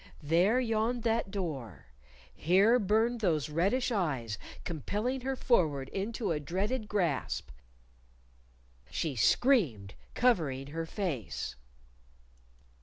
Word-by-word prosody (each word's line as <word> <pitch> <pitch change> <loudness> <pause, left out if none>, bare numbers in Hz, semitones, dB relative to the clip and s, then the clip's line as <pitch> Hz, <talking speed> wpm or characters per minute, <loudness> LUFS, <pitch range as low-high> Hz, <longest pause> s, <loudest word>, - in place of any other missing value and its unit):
There 175 - +3
yawned 230 0 0
that 230 -3 +1
door 145 - -5 0.5
here 200 +9 +4
burned 225 +3 +2
those 160 -7 +1
reddish 195 +12 +1
eyes, 135 - -1 0.2
compelling 210 - -2
her 265 +1 -2
forward 155 - +1
into 210 +1 -2
a 155 - 0
dreaded 205 - -2
grasp 180 -9 -1 1.4
She 155 -5 -2
screamed, 120 - +2 0.2
covering 155 - +2
her 165 +1 -4
face. 160 - -3
190 Hz, 100 wpm, -31 LUFS, 150-230 Hz, 1.4 s, here